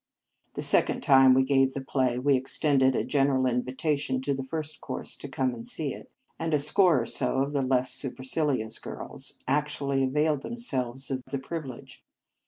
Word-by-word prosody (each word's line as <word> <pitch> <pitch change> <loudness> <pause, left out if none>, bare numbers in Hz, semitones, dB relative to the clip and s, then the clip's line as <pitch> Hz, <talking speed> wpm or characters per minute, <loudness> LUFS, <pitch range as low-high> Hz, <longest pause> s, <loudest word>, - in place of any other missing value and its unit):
The - - -2
second - - +5
time 135 -1 +6
we 130 - +3
gave 135 -1 +1
the 135 - -3
play, 130 -2 -1
we 135 +2 +2
ex 130 +1 +1
tended 135 -4 +2
a - - 0
general 135 -2 +1
invitation 130 +3 -1
to 140 +1 -1
the 135 - -4
First 155 +2 -6
Cours - - -6
to 140 - -8
come 130 -1 -1
and 115 -1 -9
see 145 -4 -2
it; - - -12 0.3
and 165 -2 -1
a - - +3
score 155 +2 +3
or - - -4
so 135 +3 0
of 140 +1 -5
the 140 - 0
less 130 -1 +2
supercilious 130 -3 0
girls - - -7
actually 140 -1 -1
availed 150 +2 0
themselves 135 - -3
of 130 -1 -3
the 140 +1 -4
privilege. 135 -2 -8
135 Hz, 185 wpm, -26 LUFS, 130-145 Hz, 0.3 s, time